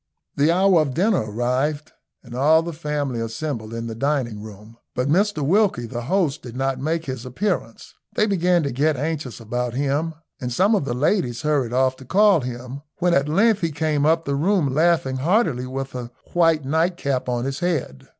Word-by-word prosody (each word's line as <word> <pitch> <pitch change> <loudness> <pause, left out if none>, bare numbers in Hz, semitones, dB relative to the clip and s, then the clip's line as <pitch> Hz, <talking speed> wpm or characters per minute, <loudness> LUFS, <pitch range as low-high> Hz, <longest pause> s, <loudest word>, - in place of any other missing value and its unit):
The 145 +3 +3
hour 185 -1 +4
of 140 -4 -2
dinner 185 - +1
arrived, 130 +7 -1 0.3
and 120 -3 -12
all 155 +6 +4
the 170 0 -5
family 150 -5 -3
assembled 115 -1 -4
in 115 0 -4
the 115 - -4
dining 120 -3 -1
room, 105 +1 -12 0.2
but 125 +1 0
Mr 175 -1 +1
Wilkie, 185 - +2
the 120 0 -5
host, 155 +2 0
did 120 -1 -9
not 135 0 -1
make 160 +4 -1
his 130 -4 -5
appearance. 130 - -3 0.2
They 215 - +3
began 180 -4 +2
to 140 - -1
get 145 +4 +1
anxious 150 -3 -3
about 120 +1 -3
him, 145 +4 -1 0.2
and 125 -2 -4
some 190 - +3
of 200 -10 +1
the 120 - -2
ladies 140 - 0
hurried 145 -6 +1
off 130 +1 +1
to 130 - -12
call 200 - +4
him, 125 +2 -6 0.2
when 175 0 +2
at 140 0 +2
length 205 +5 +3
he 165 -2 0
came 150 -1 0
up 160 +2 +2
the 140 - -1
room 155 -1 +1
laughing 155 -4 +2
heartily 150 - +1
with 135 +1 -5
a 125 -2 -5 0.2
white 165 -4 +3
night 165 +5 +1
cap 135 -5 -2
on 120 0 -1
his 135 0 -3
head. 165 - -2
140 Hz, 195 wpm, -22 LUFS, 125-165 Hz, 0.3 s, hour